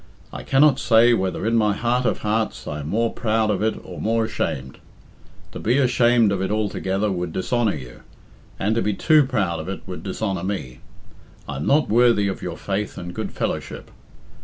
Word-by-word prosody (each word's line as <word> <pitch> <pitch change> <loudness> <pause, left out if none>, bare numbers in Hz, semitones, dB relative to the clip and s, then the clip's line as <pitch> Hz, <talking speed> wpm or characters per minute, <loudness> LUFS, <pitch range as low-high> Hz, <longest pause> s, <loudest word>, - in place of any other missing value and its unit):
I - - -6
cannot 140 +1 +4
say 115 +1 +5
whether 95 -2 -1
in 115 +1 +1
my 105 -3 +2
heart 125 +2 0
of - - -1
hearts 110 +1 -1
I 75 - -4
am 75 - -6
more 115 +4 0
proud 110 -2 +1
of 100 - -1
it 110 0 0
or - - -8
more 115 +1 +1
ashamed. 70 -11 -4 0.7
To - - -7
be 120 +5 +1
ashamed 120 -4 +3
of 95 -2 -1
it 95 - -1
altogether 105 -1 -1
would 90 -2 -3
dishonour 110 +3 0
you, 65 -4 -10 0.6
and 105 +3 0
to 115 - +1
be 105 -1 0
too 155 +4 +4
proud 95 -10 -1
of 80 +3 -6
it 95 - -5
would 90 -2 -7
dishonour 95 -2 -3
me, 95 -11 -4 0.7
I 70 - -5
am 70 - -3
not 150 +2 +3
worthy 115 -2 +4
of 95 - -4
your 85 -1 -5
faith 100 +1 -3
and 90 0 -6
good - - -4
fellowship. - - -4
105 Hz, 195 wpm, -22 LUFS, 95-115 Hz, 0.7 s, say